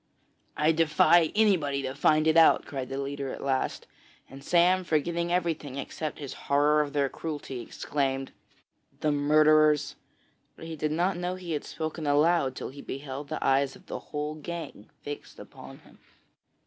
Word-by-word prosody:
'I 155 +1 +3
defy 165 +1 +4
anybody 165 -11 +2
to 130 0 -3
find 155 +2 +3
it 160 0 +3
out!' 165 -1 +6
cried 135 -2 -5
the 135 - -4
leader 140 -1 -4
at - - -7
last, 135 -1 -1 0.5
and 135 +1 -11
Sam, 180 +3 +3
forgetting 170 +1 -1
everything, 165 -6 -1
except 150 +2 -5
his 140 -3 -7 0.2
horror 145 +2 +4
of 145 -1 -4
their 140 -1 +2
cruelty, 145 -4 -6
exclaimed: 135 +2 -3 0.7
'The 155 - +2
murderers!' 150 0 +4 0.6
but - - -11
he 165 0 -6
did 155 0 -2
not 175 +3 0
know 180 +1 -2
he 180 -2 -7
had 150 - -2
spoken 155 -1 -5
aloud 145 -2 +3
till - - -5
he 140 +2 -10
beheld 140 +1 -6
the 155 - -3
eyes 135 0 +2
of - - -18
the - - -5
whole 150 0 -3
gang 155 -7 -8
fixed 145 0 -8
upon - - -12
him. - - -21
150 Hz, 165 wpm, -28 LUFS, 140-165 Hz, 0.7 s, out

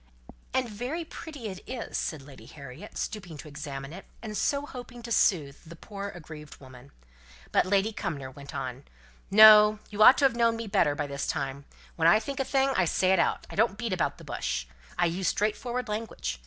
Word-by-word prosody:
"And 260 -1 0
very 250 +10 -4
pretty 305 -6 -9
it 190 -2 -6
is," 250 -2 -5
said 155 -4 -3
Lady 135 -1 -14
Harriet, 140 -1 -11
stooping 180 -7 -5
to 150 - -10
examine 140 -1 -7
it, 190 - -10 0.2
and 215 -2 -6
so 280 +6 0
hoping 245 -3 -10
to 235 - -7
soothe 150 -10 +2
the 170 +1 -12
poor 200 +3 -7
aggrieved 155 -4 -11
woman. 130 0 -14 0.6
But - - +3
Lady 200 +3 +2
Cumnor 140 -9 -4
went 140 +1 -11
on, 130 +1 -5 0.5
"No! 215 +1 +9
you 205 +1 -3
ought 250 - +9
to 285 - +3
have 260 -3 +3
known 230 -1 +3
me 230 - -5
better 195 -8 +2
by 145 - -2
this 140 -1 -4
time. 140 0 -3 0.3
When 165 -1 +3
I 170 +6 +6
think 275 +4 -6
a - - +2
thing 270 0 +2
I 190 -9 +2
say 185 +3 +2
it 190 - +4
out. 170 - +1
I - - -9
don't 215 -1 +2
beat 230 -4 -2
about 180 - -1
the - - -13
bush. - - -3 0.3
I 175 - +3
use 175 +2 -1
straightforward 240 +6 -1
language. 210 - -4
195 Hz, 205 wpm, -28 LUFS, 145-230 Hz, 0.6 s, No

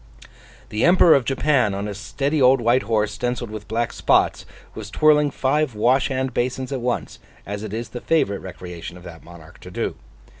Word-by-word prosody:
The 105 +2 -2
Emperor 175 -1 +6
of 135 -4 +2
Japan, 135 -6 +1
on 100 +1 -3
a 105 - -4
steady 140 +8 -2
old 130 +1 +5
white 120 +2 +3
horse 105 -3 0
stencilled 120 +1 -3
with 110 -1 -8
black 115 +2 -2
spots, - - +1 0.3
was 105 -2 -8
twirling 150 +3 +4
five 135 -1 0
wash 125 +4 +2
hand 130 -1 -2
basins 130 +2 -2
at 135 -3 -3
once, 120 0 -3 0.3
as 100 +1 -5
it 110 -2 -6
is 115 +2 -5
the 120 - -7
favourite 100 -12 +1
recreation 90 -2 -8
of 90 - -14
that 80 -2 -11
monarch 85 -2 -14
to - - -11
do. - - -3
120 Hz, 190 wpm, -22 LUFS, 105-135 Hz, 0.3 s, Emperor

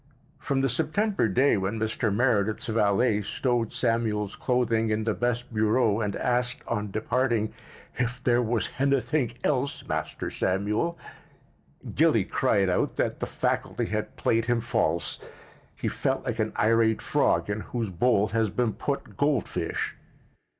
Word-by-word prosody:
From 135 -1 0
the 135 - +2
September 160 - +1
day 125 +5 +3
when 95 +3 -2
Mr. 110 +1 0
Meredith's 110 -2 +1
valet 110 0 +2
stowed 120 0 -1
Samuel's 110 -4 0
clothing 115 -3 +1
in 110 0 0
the 110 0 0
best 120 0 -2
bureau 110 0 +2
and 105 -2 -1
asked, 125 0 -1
on 105 -3 -2
departing, 115 +1 0 0.4
"hif 125 -1 -2
there 120 0 +3
was 115 -4 0
hanything 140 -1 +1
helse, 140 -1 -1
Master - - -3
Samuel?" 105 - 0 1.0
Gilly - - +4
cried 100 -1 +2
out 90 - 0
that - - -1
the - - -2
faculty - - -1
had - - -3
played 115 0 +1
him 120 -1 +1
false. 110 -8 -1 0.6
He - - -3
felt 135 0 -1
like 120 -2 -3
an 110 0 0
irate 110 0 +3
frog - - +2
in 105 +1 -2
whose 115 -1 -4
bowl 105 +2 +2
has 110 +1 +1
been 115 +2 0
put 140 -1 -4
goldfish. 145 -4 -1
115 Hz, 145 wpm, -27 LUFS, 105-125 Hz, 1.0 s, Gilly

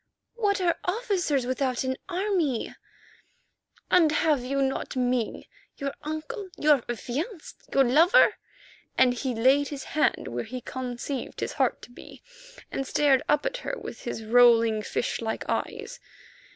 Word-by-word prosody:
"What 410 -4 0
are 350 -2 +1
officers 360 - 0
without 255 0 -1
an 260 0 -1
army?" 355 - -1 1.2
"And 335 -4 +5
have 300 -4 +2
you 275 +2 -1
not 270 0 -2
me, 250 -3 -1 0.3
your 275 0 -3
uncle, 345 +8 -5
your 295 -3 +4
affianced, 300 - -5
your 275 - +5
lover?" 330 - +5 0.6
and 255 -1 +5
he 250 0 -3
laid 265 +5 +4
his 280 -2 -6
hand 305 - 0
where 120 0 -3
he 255 +1 -6
conceived 255 +2 -5
his - - -3
heart - - 0
to - - -12
be, - - -13 0.5
and 270 - -3
stared 280 -3 +3
up 295 - +2
at - - -1
her - - -4
with - - -8
his 225 - -5
rolling, 230 -1 +5
fish 225 - -2
like 220 -1 -3
eyes. - - -3
275 Hz, 145 wpm, -26 LUFS, 245-330 Hz, 1.2 s, And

